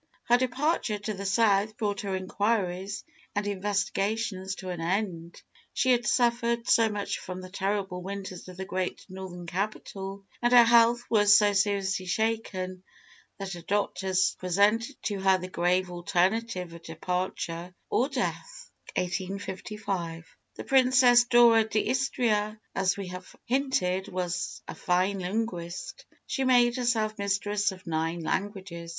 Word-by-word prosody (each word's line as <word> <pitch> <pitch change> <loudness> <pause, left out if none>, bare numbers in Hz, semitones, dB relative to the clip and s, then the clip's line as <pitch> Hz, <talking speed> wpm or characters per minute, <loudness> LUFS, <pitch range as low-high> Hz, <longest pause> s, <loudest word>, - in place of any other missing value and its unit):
Her 240 - +4
departure 255 -2 0
to 210 +1 -4
the 200 0 -4
South 210 +1 +2
brought 205 -3 -1
her 195 -2 -2
inquiries 195 0 -1 0.3
and 205 0 0
investigations 200 0 -1
to 185 -2 -7
an 175 -2 -4
end. 175 -2 -2 0.3
She 260 - +2
had 240 -1 +2
suffered 235 -1 +1
so 225 -1 +5
much 205 -1 -3
from 185 0 -7
the 185 0 -10
terrible 195 -2 -2
winters 190 -1 -6
of 185 -1 -10
the 190 - -4
great 185 -1 -3
Northern 185 -2 -8
capital, 195 +1 -4 0.2
and 240 0 +2
her 240 -1 +10
health 235 +1 +5
was 205 -2 +6
so 205 -1 +3
seriously 195 -2 0
shaken, 185 -3 -2 0.6
that 195 -1 -5
her 175 - -7
doctors 190 -1 0
presented 210 +8 +2
to 205 -2 -2
her 190 0 +4
the 185 0 -6
grave 180 +1 +1
alternative 180 +1 0
of 170 - -10
departure 175 +1 -4
or 260 +4 +1
death - - -4 0.2
(1855). 190 -2 -3 0.3
The - - -6
Princess 255 -2 +5
Dora 240 -2 +6
d'Istria, 220 -1 0
as 195 0 +1
we 195 -2 -5
have 180 0 -9
hinted, 210 -8 0
was 180 -2 -3
a - - -5
fine 185 +2 0
linguist. 190 +4 -4 0.2
She 270 -2 -1
made 245 -2 +4
herself 225 -3 0
mistress 200 0 0
of 185 -1 -12
nine 165 +1 -1
languages. 185 -2 -3
200 Hz, 140 wpm, -28 LUFS, 185-225 Hz, 0.6 s, her